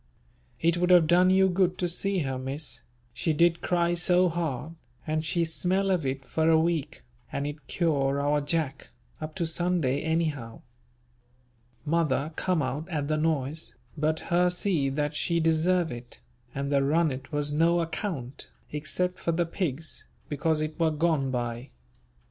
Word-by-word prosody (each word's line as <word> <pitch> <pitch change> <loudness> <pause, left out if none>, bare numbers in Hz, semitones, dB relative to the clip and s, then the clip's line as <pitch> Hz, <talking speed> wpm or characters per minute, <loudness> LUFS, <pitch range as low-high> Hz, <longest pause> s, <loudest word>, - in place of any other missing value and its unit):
It 170 +1 +2
would 180 +1 +1
have 175 -3 +7
done 175 +3 +5
you 190 0 +5
good 185 0 +1
to 180 - 0
see 190 +2 0
her 130 -1 -2
Miss, 135 +3 -4 0.3
she 155 +6 0
did 170 +2 +3
cry 175 -1 +1
so 180 +1 +3
hard, 160 -3 -3 0.3
and 155 0 -1
she 165 +2 +1
smell 185 +4 0
of 170 -7 +1
it 135 0 -3
for 160 0 +1
a 160 -1 +6
week, 160 -2 -1 0.3
and 140 - -2
it 145 -2 -6
cure 140 -5 +1
our 145 +1 +1
Jack, 145 -2 -2 0.3
up 155 0 -6
to 175 -3 -1
Sunday 160 -5 0
anyhow. 155 -8 -2 1.2
Mother 155 -1 +1
come 180 -4 +1
out 140 +7 -3
at 150 -4 -2
the 155 - +1
noise, 155 -1 -1 0.2
but 155 +1 0
her 180 +1 +4
see 180 -6 0
that 145 +2 -1
she 170 +3 0
deserve 165 +2 +2
it, 120 0 -9 0.4
and 140 +1 -2
the 140 -1 +3
runnet 140 -2 0
was 145 -1 0
no 165 +3 +3
account, 160 - -4 0.2
except 180 +5 -2
for 170 - 0
the 170 +1 +1
pigs, 160 -3 -3 0.2
because 155 +2 0
it 155 +2 -4
were 165 -1 +3
gone 155 -3 +1
by. 120 0 -3
160 Hz, 160 wpm, -27 LUFS, 145-170 Hz, 1.2 s, have